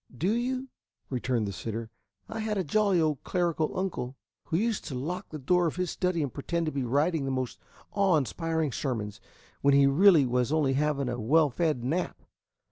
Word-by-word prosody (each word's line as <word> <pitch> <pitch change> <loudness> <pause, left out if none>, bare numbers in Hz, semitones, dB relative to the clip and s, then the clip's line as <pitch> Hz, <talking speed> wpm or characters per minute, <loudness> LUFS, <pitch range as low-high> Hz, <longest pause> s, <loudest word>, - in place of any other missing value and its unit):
"Do 180 - +1
you?" 255 +3 -1 0.4
returned 125 -3 0
the - - -3
sitter. 110 +3 -5 0.4
"I 220 - -5
had 215 -1 -1
a 190 - +1
jolly 195 +3 +2
old 155 -4 0
clerical 170 -4 0
uncle 140 -9 -3 0.3
who 160 - 0
used 225 +2 0
to 140 - -5
lock 175 +9 -4
the 155 - -6
door 175 +5 +2
of 160 - -3
his 180 -1 -1
study 180 -4 0
and 135 - -4
pretend 170 +4 -2
to 155 - -1
be 140 - -2
writing 145 +5 +1
the - - -1
most 130 -2 -3 0.3
awe 195 -5 +3
inspiring 160 +1 -1
sermons, 110 -6 -3 0.4
when 140 0 +4
he 140 0 +6
really 160 +2 +6
was 125 +1 0
only 150 -4 +2
having 140 -1 0
a 120 -1 -3
well 150 +5 +4
fed 150 -3 0
nap. 160 +9 -1
155 Hz, 195 wpm, -28 LUFS, 130-180 Hz, 0.4 s, he